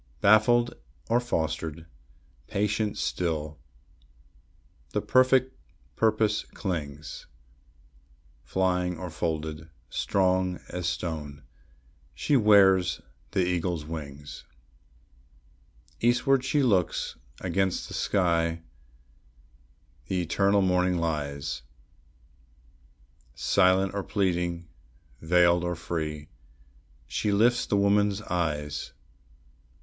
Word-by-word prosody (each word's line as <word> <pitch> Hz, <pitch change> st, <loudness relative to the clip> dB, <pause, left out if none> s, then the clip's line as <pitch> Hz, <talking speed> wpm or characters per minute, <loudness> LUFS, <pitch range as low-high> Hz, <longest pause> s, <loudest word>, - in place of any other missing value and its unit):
Baffled 120 Hz, +5 st, +4 dB, 0.4 s
or 120 Hz, -, +5 dB
fostered, 80 Hz, -7 st, -3 dB, 0.6 s
patient 105 Hz, +1 st, -1 dB
still, 80 Hz, -3 st, -2 dB, 1.3 s
the -, -, +1 dB
perfect 130 Hz, 0 st, +3 dB, 0.4 s
purpose 110 Hz, -1 st, +2 dB
clings; 75 Hz, -6 st, -5 dB, 1.2 s
Flying 90 Hz, -2 st, 0 dB
or 90 Hz, 0 st, -6 dB
folded, 80 Hz, 0 st, -3 dB, 0.2 s
strong 95 Hz, -1 st, +1 dB
as 90 Hz, -2 st, -3 dB
stone, 75 Hz, -5 st, -5 dB, 0.7 s
she 145 Hz, -, +1 dB
wears 100 Hz, -5 st, +5 dB, 0.3 s
the 95 Hz, -3 st, +2 dB
eagle's 85 Hz, -3 st, -1 dB
wings. 75 Hz, -2 st, -8 dB, 1.6 s
Eastward 125 Hz, +3 st, +3 dB
she 140 Hz, +2 st, +1 dB
looks; 95 Hz, -9 st, +1 dB, 0.2 s
against 95 Hz, +1 st, -1 dB
the -, -, -9 dB
sky 85 Hz, -3 st, +1 dB, 1.4 s
the 95 Hz, -, -1 dB
eternal 100 Hz, +3 st, +2 dB
morning 90 Hz, -1 st, +2 dB
lies; 75 Hz, -6 st, -3 dB, 1.7 s
Silent 95 Hz, 0 st, +3 dB
or 100 Hz, -, -2 dB
pleading, 90 Hz, -4 st, -1 dB, 0.5 s
veiled 85 Hz, +1 st, +4 dB
or 90 Hz, 0 st, -1 dB
free, 80 Hz, -2 st, -4 dB, 0.8 s
she 105 Hz, -, -1 dB
lifts 120 Hz, +4 st, +3 dB
the 100 Hz, -, +1 dB
woman's 100 Hz, +1 st, +2 dB
eyes. 75 Hz, -5 st, -2 dB
90 Hz, 80 wpm, -27 LUFS, 80-100 Hz, 1.7 s, or